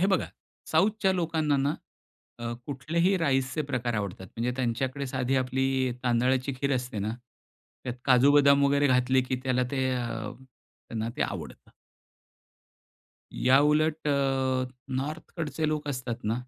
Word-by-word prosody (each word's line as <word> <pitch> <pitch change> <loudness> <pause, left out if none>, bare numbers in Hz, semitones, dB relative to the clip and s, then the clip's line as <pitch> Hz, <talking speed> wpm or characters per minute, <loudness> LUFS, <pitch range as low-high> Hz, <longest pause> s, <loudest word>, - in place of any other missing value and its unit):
हे 190 - +4
बघा 195 -2 +1 0.5
साउथच्या 195 +3 +3
लोकांना 160 -4 +1
ना 140 +3 +1 0.6
अ, 120 0 -3
कुठलेही 165 +7 +1
राईसचे 135 -1 +1
प्रकार 125 -4 -2
आवडतात. 100 -3 -4
म्हणजे 120 +2 -1
त्यांच्याकडे 130 +3 -1
साधी 130 +1 -1
आपली 130 0 +1
तांदळाची 125 +3 +2
खीर 140 -1 +1
असते 125 -3 -4
ना, 105 +2 -1 0.7
त्यात 125 -1 -3
काजू, 130 +1 +5
बदाम 140 -1 +6
वगैरे 140 +1 +3
घातले 130 0 +3
की 130 - 0
त्याला 125 -1 +1
ते 130 -1 +1
अ, 115 -3 -3 0.6
त्यांना 115 0 -3
ते - - +1
आवडतं. - - -6 1.7
याउलट 150 +4 +3
अ, 135 -2 +1 0.3
नॉर्थकडचे 155 +2 -3
लोक 150 -1 -2
असतात 125 -4 -4
ना 110 +2 +1
135 Hz, 130 wpm, -28 LUFS, 125-145 Hz, 1.7 s, बदाम